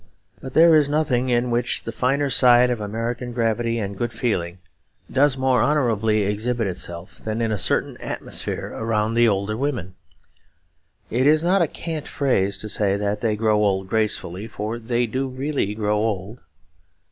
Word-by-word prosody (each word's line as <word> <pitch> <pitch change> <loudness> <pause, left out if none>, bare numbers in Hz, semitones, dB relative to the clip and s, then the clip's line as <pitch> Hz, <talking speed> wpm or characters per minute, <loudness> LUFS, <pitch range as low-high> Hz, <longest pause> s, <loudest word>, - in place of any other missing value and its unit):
But 130 - -9
there 165 +1 +7
is 150 -2 +4
nothing 140 -4 +1
in 120 0 +1
which 120 +1 0
the 115 - -5
finer 135 +4 0
side 125 -1 +6
of 120 -3 -2
American 115 +4 -4
gravity 115 0 0
and 100 -3 -3
good 120 +3 -2
feeling 90 -9 -2 0.5
does 140 0 +3
more 130 -3 +2
honourably 110 -6 +2
exhibit 110 +4 -1
itself 90 -2 -5
than 110 +1 -4
in 115 -1 0
a 105 - 0
certain - - 0
atmosphere - - -5
around 110 -1 -1
the 120 0 +4
older 100 0 0
women. 120 - -3 1.2
It 130 +4 +2
is 155 +1 +4
not 185 +2 +3
a 170 - +3
cant 160 0 -5
phrase 100 -8 0
to 110 - -5
say 100 -1 0
that 105 0 -2
they 110 -3 +1
grow 105 -1 +2
old 95 -2 0
gracefully; 105 -2 -1
for 110 +2 -5
they 120 +1 0
do 130 +4 -2
really 130 -5 -2
grow 105 -1 0
old. 105 +1 -3
115 Hz, 170 wpm, -22 LUFS, 105-130 Hz, 1.2 s, there